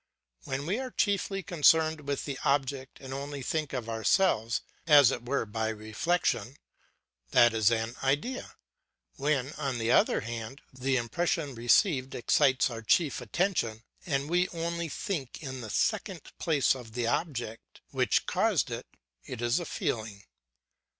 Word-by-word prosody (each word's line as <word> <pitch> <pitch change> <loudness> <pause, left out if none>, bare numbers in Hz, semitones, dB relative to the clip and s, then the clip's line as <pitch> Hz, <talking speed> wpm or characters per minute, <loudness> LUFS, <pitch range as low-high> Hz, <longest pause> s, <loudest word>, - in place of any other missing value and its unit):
When 135 +2 -3
we 195 +9 -1
are 260 -1 -4
chiefly 200 -3 0
concerned 160 -3 +3
with 140 -1 -2
the 140 -2 -4
object 135 -1 -1
and 135 -1 -8
only 140 0 -5
think 155 +2 -2
of 125 -4 -4
ourselves 115 - +2 0.3
as 145 -5 +8
it 120 - -4
were 135 -1 0
by 110 +1 -2
reflection, 110 +3 -1 0.7
that 120 - +5
is 110 -2 +4
an 115 0 -1
idea; 145 - -1 0.6
when, 140 -1 0
on 135 -4 -1
the 115 0 0
other - - +4
hand, 115 +3 -6
the 130 +1 0
impression 145 +4 -1
received 130 - +2
excites 130 +1 +3
our 115 -1 -6
chief 140 +5 +2
attention 120 - -1 0.2
and 140 -3 -1
we 180 +2 +2
only 170 0 -3
think 160 - -4
in 130 -2 -5
the 110 - -7
second - - -1 0.2
place 150 -4 +3
of 120 -4 -10
the 120 0 -1
object 120 -4 -3
which - - +1
caused - - +1
it, - - -5 0.4
it - - -7
is 120 +5 +1
a 175 - -5
feeling. 110 -8 -3
135 Hz, 150 wpm, -29 LUFS, 115-160 Hz, 0.7 s, as